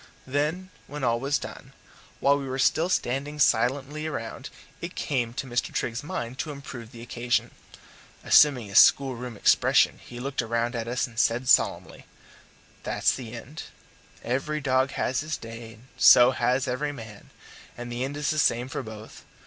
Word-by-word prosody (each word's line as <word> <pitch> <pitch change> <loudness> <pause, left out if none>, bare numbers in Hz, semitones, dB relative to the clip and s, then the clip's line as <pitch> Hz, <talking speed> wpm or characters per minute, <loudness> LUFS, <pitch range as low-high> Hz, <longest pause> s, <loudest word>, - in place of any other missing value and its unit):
Then, 150 +7 -2 0.2
when 145 -1 -7
all 115 -1 +1
was 140 +3 0
done, - - -10 0.5
while 140 +1 +4
we 140 -1 -4
were 130 - -3
still 160 +6 +2
standing 140 -2 -1
silently 140 +3 +1
around, 115 -7 -6 0.3
it - - -6
came 125 -5 -1
into 125 +4 -5
Mr. 120 -1 -2
Trigg's 115 0 -2
mind 130 -6 -5
to 155 - -3
improve 130 -5 -9
the 115 -2 -11
occasion. 120 0 -1 0.7
Assuming 135 -6 +5
his 100 - +6
schoolroom 125 -4 +3
expression - - +3
he 120 - -10
looked 135 +1 -2
round 115 +1 -1
at 115 -1 -3
us 125 +2 -1
and 115 -3 -8
said 120 +3 +1
solemnly: - - +2 0.7
"That's - - +1
the 120 -3 -7
end. 125 +6 -8 0.6
Every 135 +5 -2
dog 130 -1 +1
has 130 -1 -1
his 155 +1 -3
day 115 0 -9
and 110 +1 -19
so 125 +1 +8
has 130 +1 0
every 140 +4 -2
man; 110 -6 -11 0.5
and 120 0 -7
the 120 +1 -3
end 140 +2 -4
is 150 0 0
the 155 - -1
same 120 -2 +2
for 145 - -4
both. 110 -2 -11
130 Hz, 170 wpm, -26 LUFS, 120-140 Hz, 0.7 s, so